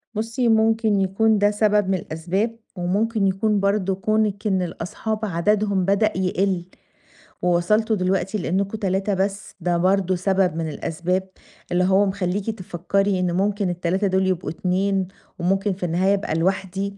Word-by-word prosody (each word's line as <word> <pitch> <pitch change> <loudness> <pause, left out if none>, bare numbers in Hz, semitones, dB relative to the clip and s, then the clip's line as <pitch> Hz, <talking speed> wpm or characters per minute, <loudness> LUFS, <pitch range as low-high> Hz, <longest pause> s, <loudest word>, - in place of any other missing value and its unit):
بُصي، 230 +3 -1
مُمكن 220 -1 +3
يكون 210 +3 +2
ده 205 0 +3
سبب 210 -2 +2
من - - +2
الأسباب 185 +7 -2 0.2
ومُمكن 200 +4 0
يكون 205 +2 +1
برضه 200 -1 +1
كونِك 215 +1 0
إن 190 -2 +1
الأصحاب 180 +5 -4
عددهم 200 +1 +1
بدأ 200 +3 +2
يقل، 185 -1 0 0.8
ووصلتم 195 +6 +2
دلوقتي 190 +1 0
لأنكم 195 +3 -1
3 195 0 0
بس. 195 +1 -2
ده 175 0 0
برضه 185 +1 +2
سبب 185 -2 +1
من 165 -1 -2
الأسباب 175 +5 -2 0.5
اللي 175 +1 +2
هو 190 +2 +4
مخليكِ 195 +1 -2
تفكري، 195 -1 -1
إنه 180 -1 0
مُمكن 200 +1 0
ال3 180 +3 0
دُول 190 0 +1
يبقوا 185 -1 -1
2 190 +2 0 0.3
ومُمكن 195 +3 +1
في 185 - -9
النهاية 180 +4 +2
ابقى 195 -5 -1
لوحدي 190 +3 -1
195 Hz, 145 wpm, -22 LUFS, 180-205 Hz, 0.8 s, هو